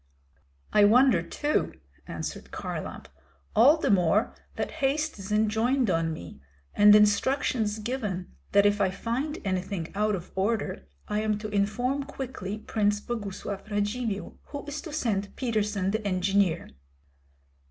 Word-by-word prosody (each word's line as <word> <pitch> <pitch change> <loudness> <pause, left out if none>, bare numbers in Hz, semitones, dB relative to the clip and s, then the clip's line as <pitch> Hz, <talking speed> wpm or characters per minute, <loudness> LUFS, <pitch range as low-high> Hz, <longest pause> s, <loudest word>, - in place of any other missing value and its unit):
"I 210 - +6
wonder 230 -2 +6
too," 295 - -1 0.3
answered - - -6
Kharlamp, - - -5 0.5
"all 275 +8 +7
the 310 - +1
more 195 +2 +3 0.2
that - - -3
haste 290 -1 0
is 195 +1 -7
enjoined 220 +3 +2
on 165 -1 +1
me, 85 - -8 0.3
and 205 0 +7
instructions 210 +1 +2
given 210 -5 -3 0.2
that 200 0 +5
if 205 0 +3
I 190 - +3
find 250 - -3
anything 185 -2 -2
out 210 +1 +1
of 175 -2 -8
order 195 - -1 0.2
I 210 0 0
am 215 -1 0
to 215 0 -6
inform 215 +7 0
quickly 260 -8 -5
Prince 210 -1 0
Boguslav 205 -2 -5
Radzivill, 205 0 -2
who 285 0 -7
is 290 +1 -5
to 320 - -8
send 210 -9 -1
Peterson 210 -5 0
the 220 +1 -2
engineer." 185 -2 +1
210 Hz, 135 wpm, -27 LUFS, 195-245 Hz, 0.5 s, all